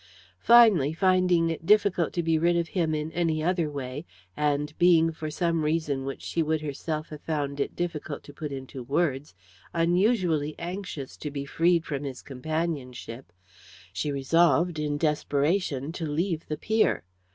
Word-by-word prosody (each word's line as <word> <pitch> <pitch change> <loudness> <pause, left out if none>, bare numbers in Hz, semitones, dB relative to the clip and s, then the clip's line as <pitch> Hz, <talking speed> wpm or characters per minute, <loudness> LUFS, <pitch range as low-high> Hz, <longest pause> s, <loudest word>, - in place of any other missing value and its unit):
Finally, 215 - +6
finding 180 -2 +3
it 165 - -5
difficult 195 -3 +3
to 175 - -2
be 160 -1 +2
rid 170 +1 +3
of 170 -1 -1
him 160 -3 0
in 155 +1 -3
any 160 -2 0
other 175 -2 +1
way, 140 0 -5 0.3
and 150 0 0
being, 165 -2 +5
for 155 -1 -6
some 165 0 0
reason 150 -4 -1
which 135 - -6
she 165 - -1
would 160 0 0
herself 155 +1 -4
have 150 -1 -9
found 145 -3 -3
it 140 - -2
difficult 165 -4 -4
to 145 - -12
put 150 0 -6
into 135 -1 -7
words, 135 - -1 0.4
unusually 170 -3 +2
anxious 175 -6 -6
to 150 - -6
be 140 -1 -5
freed 170 +3 +2
from 140 -2 -3
his 135 -3 -6
companionship, 135 - -4 0.6
she 120 +10 -2
resolved, 165 +4 +2
in 150 -1 -1
desperation, 150 0 0
to 165 -2 -4
leave 165 +2 -2
the 150 - -3
pier. 220 +6 +1
155 Hz, 160 wpm, -27 LUFS, 145-170 Hz, 0.6 s, Finally